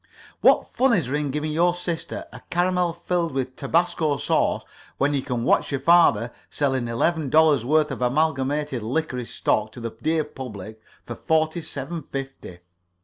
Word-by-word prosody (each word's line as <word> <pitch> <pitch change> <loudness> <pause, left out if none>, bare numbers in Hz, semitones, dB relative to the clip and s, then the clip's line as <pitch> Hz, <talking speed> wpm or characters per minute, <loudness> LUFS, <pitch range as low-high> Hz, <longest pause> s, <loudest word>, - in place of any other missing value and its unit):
What - - +5
fun 260 -1 +2
is 180 -9 +2
there 130 - -4
in 150 -1 -1
giving 150 +3 -2
your 175 +3 +2
sister 175 -2 -4
a - - -10
caramel 180 0 +1
filled 170 -1 -2
with 130 -1 -3
tabasco 160 0 +1
sauce - - +1 0.3
when 145 +2 +1
you 140 - 0
can 125 -3 -3
watch - - +2
your 140 - -1
father 135 -7 +4 0.2
selling 130 -4 0
eleven 145 +6 0
dollars' 155 -5 +4
worth 150 +2 +2
of 130 - -5
Amalgamated 140 0 0
Licorice 125 0 -3
stock 110 0 0
to - - -9
the 115 -1 -4
dear 160 0 +1
public 110 -7 -9 0.2
for 120 - -5
forty 160 +5 0
seven 155 +3 -5
fifty? 135 -10 -7
145 Hz, 165 wpm, -24 LUFS, 130-165 Hz, 0.3 s, What